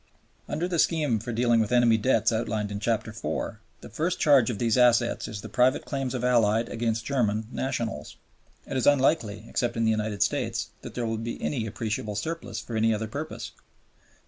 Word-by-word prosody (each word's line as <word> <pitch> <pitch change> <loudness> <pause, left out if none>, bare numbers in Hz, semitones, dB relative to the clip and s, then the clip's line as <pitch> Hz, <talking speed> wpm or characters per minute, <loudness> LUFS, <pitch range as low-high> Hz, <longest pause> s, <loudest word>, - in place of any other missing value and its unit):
Under 160 +4 -1
the 175 -2 -1
scheme 150 -10 +2
for 120 +3 -5
dealing 120 0 +3
with 110 +1 0
enemy 120 -2 +5
debts 110 +4 +2
outlined 110 -2 -1
in 100 - -3
Chapter 115 +1 -1
IV., 110 0 -4 0.2
the - - -10
first 165 - -1
charge 140 -7 +5
on 115 - -2
these 115 -1 +1
assets 120 -1 +3
is 105 -3 -6
the - - -7
private 130 +1 +2
claims 135 -3 -3
of 125 - -3
Allied 115 -2 +3
against 115 -1 -2
German 110 -6 0
nationals. 120 -4 -3 0.5
It - - -6
is 130 - +1
unlikely, 130 -7 +2
except 120 -1 -1
in 115 - +1
the 110 - +4
United 110 -2 0
States, - - -2
that - - -9
there 120 - -1
will 115 0 -1
be 115 +1 -5
any 120 -6 -2
appreciable 105 -1 -3
surplus 120 -2 -4
for 115 - -7
any 110 0 +3
other 110 +1 -3
purpose. 145 +8 -6
115 Hz, 195 wpm, -27 LUFS, 110-130 Hz, 0.5 s, enemy